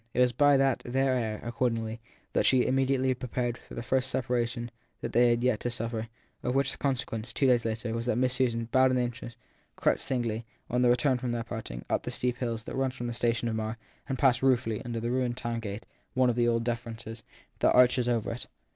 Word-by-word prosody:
It - - +1
was 125 -1 +5
by 145 +3 +5
their 135 -2 +3 0.4
aid, 110 -3 -2
accordingly, 115 -2 -1 0.3
that - - +3
she 130 -2 +4
immediately 130 0 +2
prepared 125 -1 -2
for - - -12
the 115 - -4
first 130 +1 +1
separation 120 -1 -1 0.3
they - - -3
had 120 0 +6
had 120 0 +1
yet 125 -4 +2
to 120 - -2
suffer; 115 -1 -3 0.3
of 125 +1 -1
which 135 0 +2
the - - -8
consequence, 125 -4 -2
two 140 - 0
days 125 -3 +4
later, 115 0 -2
was 115 +1 -3
that 125 - +2
Miss 130 0 +2
Susan, 120 -3 +1
bowed 130 0 +5
and 130 0 +2
anxious, 120 -1 -4 0.4
crept - - +2
singly, 120 -4 -2 0.3
on 125 +1 +2
the 125 - +5
return 125 +1 +3
from 120 -1 -2
their 115 -1 -2
parting, 110 - -6
up - - 0
the - - -5
steep 125 -1 -1
hill 115 -2 -2
that 110 - -7
leads 130 -1 0
from 120 - -5
the 120 - -2
station 120 0 0
of 115 - -1
Marr 110 +1 -3 0.3
and 135 - -1
passed 125 -2 +3
ruefully 125 -4 +2
under 120 -2 -3
the 120 +1 -2
ruined 125 -1 0
town 120 -1 -2
gate, 105 -1 -6 0.3
one 130 -1 +4
of - - -3
the 120 0 +2
old 115 -1 +2
defences, 115 -1 -5 0.4
that - - +4
arches 125 0 +5
over 115 -3 0
it. 115 - -7
120 Hz, 225 wpm, -29 LUFS, 115-130 Hz, 0.4 s, had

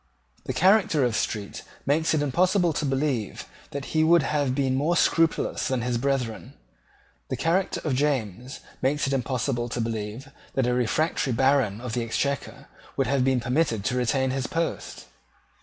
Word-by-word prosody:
The 130 - -2
character 185 -1 +4
of 120 -3 +1
Street 105 -2 -3 0.2
makes 155 +3 +2
it 145 - +1
impossible 175 +4 +2
to 150 - -2
believe 135 -5 -1 0.2
that 140 -1 -6
he 155 0 +3
would 165 0 +5
have 145 -4 0
been 135 -2 +1
more 155 +6 +1
scrupulous 165 0 +2
than 130 -4 -1
his 120 -1 -1
brethren. 125 -4 -2 0.7
The - - -2
character 180 +4 0
of 150 - 0
James 130 - -2 0.2
makes 140 +3 +1
it 140 - -1
impossible 125 -1 -1
to 120 - -3
believe 115 +3 -4 0.2
that 135 - +2
a 125 - +1
refractory 125 +3 0
Baron 130 -4 +2
of 120 -2 -6
the 120 - 0
Exchequer 140 +4 -3 0.3
would 135 - +2
have 135 0 +1
been 130 -1 +2
permitted 120 -4 0
to 125 - 0
retain 130 +2 +1
his 135 -1 -2
post. 165 0 -3
135 Hz, 165 wpm, -25 LUFS, 120-150 Hz, 0.7 s, would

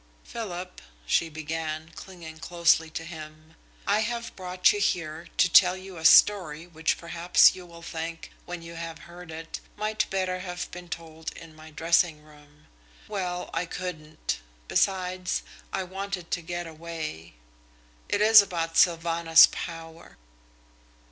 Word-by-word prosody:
"Philip," 185 -5 -6 0.2
she 165 - +2
began, 155 0 -4
clinging 165 -4 -10
closely 165 -1 +2
to 165 +1 -6
him, 155 -1 -10 0.3
"I 205 +1 +3
have 235 +1 -3
brought 180 -1 +2
you 205 - -2
here 165 -4 -1
to - - +5
tell 180 +1 +6
you 190 -1 -10
a 160 - -6
story 170 -3 +6
which 160 -2 -1
perhaps 170 +1 +4
you 185 -1 -11
will 170 -1 -13
think, 165 0 -6 0.2
when 175 -1 -6
you 165 0 -9
have 165 -1 -6
heard 170 +2 -12
it, 160 0 -7 0.2
might 215 +1 -1
better 185 -1 -1
have 180 -1 -5
been 175 0 -9
told 160 -2 -6
in 165 -2 -12
my 155 0 -13
dressing 165 0 +2
room. 150 -1 -20 0.4
Well, 180 -4 -3
I 170 +1 -1
couldn't. 160 - -5 0.3
Besides, 185 -1 0 0.3
I 190 - -1
wanted 190 -1 -5
to 175 - 0
get 175 +1 -5
away. 160 - -7 0.7
It 205 - +1
is 215 0 +9
about 165 -4 -3
Sylvanus 165 -1 +6
Power." 165 -1 -8
170 Hz, 140 wpm, -27 LUFS, 160-180 Hz, 0.7 s, is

